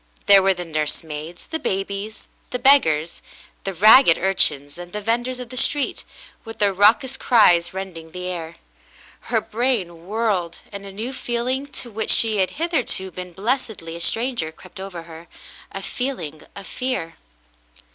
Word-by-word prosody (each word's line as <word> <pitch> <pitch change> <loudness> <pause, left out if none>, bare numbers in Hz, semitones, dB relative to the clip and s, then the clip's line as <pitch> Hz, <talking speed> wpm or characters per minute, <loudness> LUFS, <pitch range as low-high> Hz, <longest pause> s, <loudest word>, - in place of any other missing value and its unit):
There 200 -1 +8
were 190 0 +3
the 175 0 -5
nursemaids 155 +1 -4
— - - -33
the 320 - -2
babies 200 +1 -4
— - - -37
the 250 - -2
beggars 170 - +3 0.2
— - - -29
the 195 - -2
ragged 215 0 +7
urchins 145 -6 +1
and 175 0 -10
the 210 - -2
venders 240 +3 -1
of 250 -2 -8
the 255 - -6
street, 285 +2 +4 0.4
with 225 -1 -9
their 200 -2 +2
raucous 220 +7 +3
cries 175 -10 +4
rending 185 -4 -7
the 180 +2 -7
air. 170 -2 -5 0.7
Her 230 - +2
brain 210 -8 -2
whirled, 205 -6 -1
and 200 -1 -8
a - - -8
new 225 +7 -5
feel 240 -2 -3
ing 265 +2 -1 0.2
to 240 - -11
which 220 +1 -3
she 220 -2 +4
had 190 -1 +2
hitherto 280 - -1
been 180 +1 -8
blessedly 205 -5 -3
a 170 - -7
stranger 230 -5 -1
crept 185 +4 -14
over 190 -3 -7
her, 165 0 -12 0.4
a 195 - -6
feeling 215 - -4
of 200 - -9
fear. 250 -11 -4
195 Hz, 170 wpm, -22 LUFS, 170-240 Hz, 0.7 s, There